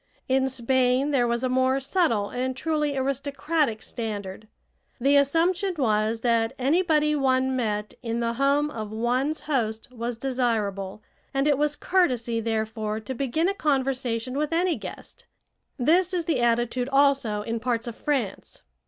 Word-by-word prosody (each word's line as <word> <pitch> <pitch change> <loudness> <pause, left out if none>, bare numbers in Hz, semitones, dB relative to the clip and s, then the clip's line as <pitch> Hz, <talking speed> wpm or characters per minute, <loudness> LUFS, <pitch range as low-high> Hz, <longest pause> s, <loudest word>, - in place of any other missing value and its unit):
In 265 0 +2
Spain 260 +2 +1
there 250 -4 +2
was 235 +1 -1
a - - +2
more 260 +1 +2
subtle 265 - +1
and 255 +1 -2
truly 300 -1 -1
aristocratic 275 -1 -1
standard. 210 -3 -5 0.5
The 275 +4 +3
assumption 340 +7 +2
was 220 -3 +1
that 230 -2 +1
anybody 300 +2 +2
one 260 -2 +2
met 210 -4 -2
in 230 -1 -2
the 230 0 0
home 280 +4 +2
of 215 -4 -6
one's 250 +7 0
host 225 -7 -2
was 240 -1 -4
desirable, 220 -6 -2 0.3
and 275 +1 +2
it 290 - +4
was 295 0 +1
courtesy, 250 -13 +1
therefore, 220 -1 -2
to 260 +4 -6
begin 275 +6 0
a 395 - +1
conversation 260 - -1
with 300 +1 -1
any 340 +1 +2
guest. - - -10 0.5
This 350 +8 +3
is 345 -2 -1
the 330 - +1
attitude 240 +2 +1
also 270 -7 +2
in 230 +1 -3
parts 235 -1 -1
of 235 -2 -5
France. 260 -10 -3
255 Hz, 150 wpm, -25 LUFS, 230-285 Hz, 0.5 s, it